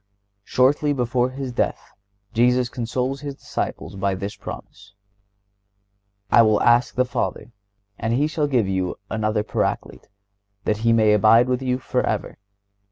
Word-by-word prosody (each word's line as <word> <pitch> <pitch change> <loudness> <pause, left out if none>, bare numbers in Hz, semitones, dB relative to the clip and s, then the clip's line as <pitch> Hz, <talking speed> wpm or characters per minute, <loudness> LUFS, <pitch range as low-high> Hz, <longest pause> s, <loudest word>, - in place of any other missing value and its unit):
Shortly 145 +5 +2
before 125 -1 0
His 130 0 -5
death 120 - -2 0.4
Jesus 125 +1 +3
consoles 125 +3 -3
His 140 -2 -6
disciples 105 - -5
by 95 0 -1
this 100 +2 -5
promise: 100 0 -10 1.4
"I 115 - +7
will 110 -2 +4
ask 120 +1 +3
the 125 - +2
Father, 125 -1 -3 0.5
and 115 - -1
He 135 +5 +2
shall 155 -1 -1
give 125 -8 +1
you 95 -2 -1 0.2
another 110 -1 0
Paraclete, - - -3 0.6
that 105 - 0
He 115 +1 +1
may 110 -2 +4
abide 110 +3 +5
with 125 0 0
you 125 -1 0
forever.... 130 - -2
120 Hz, 140 wpm, -22 LUFS, 110-130 Hz, 1.4 s, I